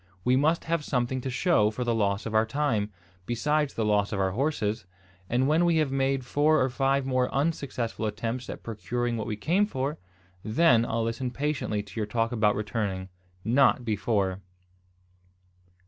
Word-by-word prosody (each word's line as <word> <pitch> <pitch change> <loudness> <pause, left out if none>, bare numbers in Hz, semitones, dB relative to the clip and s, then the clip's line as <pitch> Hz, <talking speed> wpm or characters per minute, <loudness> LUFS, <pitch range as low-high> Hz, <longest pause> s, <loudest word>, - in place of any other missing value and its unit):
We 125 +1 +3
must 155 +5 +2
have 165 -2 -1
something 125 -1 -1
to 130 - -3
show 125 - +3
for 110 +4 -3
the 120 -1 0
loss 100 -2 0
of 110 - -4
our 110 +1 +3
time, 115 -6 0 0.4
besides 150 +4 0
the 110 - 0
loss 105 -1 +2
of 105 - -2
our 95 -1 +1
horses; 110 -4 -1 0.4
and 125 +3 +2
when 155 +4 +3
we 170 -2 +3
have 155 -4 +1
made 135 -1 0
four 150 +5 +3
or 130 - +2
five 135 +1 +1
more 130 -1 +1
unsuccessful 135 -7 -1
attempts 115 +3 -4
at - - -7
procuring 120 +2 -2
what 110 -2 -3
we 110 - -2
came 180 - +2
for, 135 -4 -3 0.4
then 120 0 +4
I'll 115 0 -1
listen 115 +3 -2
patiently 130 -5 -2
to 105 +2 -8
your 105 - -1
talk 115 +2 0
about 110 -3 +2
returning, 100 -3 -3 0.4
not 125 +1 +3
before." 100 -3 0
120 Hz, 175 wpm, -27 LUFS, 110-140 Hz, 0.4 s, then